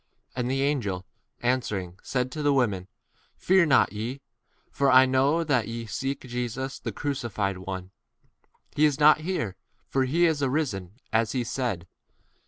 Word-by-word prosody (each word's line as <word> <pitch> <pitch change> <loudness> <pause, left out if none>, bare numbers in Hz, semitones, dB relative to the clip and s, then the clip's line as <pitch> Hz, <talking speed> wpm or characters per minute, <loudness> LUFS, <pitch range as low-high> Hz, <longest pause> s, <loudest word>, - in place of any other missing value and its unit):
And 125 -1 -1
the 135 +1 +1
angel 105 -11 -1 0.4
answered 125 -4 +1
and 90 -1 -11
said 125 -1 -1
unto 130 +4 -6
the 145 -1 +3
women, 100 -8 +1 0.5
Fear 185 -2 +4
not 135 -6 +4
ye: 115 +6 -4 0.5
for 140 0 +2
I 130 +1 +8
know 135 +5 +2
that 125 -9 +1
ye 115 0 -5
seek 135 +6 -3
Jesus, 125 +2 -4
which - - -5
was - - -12
crucified. 110 -9 -2 1.2
He 150 - +4
is 145 -1 +1
not 150 +1 +7
here: 155 - -2 0.3
for 135 -1 +1
he 165 +7 +3
is 160 -3 +1
risen, 130 - -1 0.2
as 110 0 +2
he 125 -2 0
said. 115 -7 -2
130 Hz, 160 wpm, -26 LUFS, 115-140 Hz, 1.2 s, I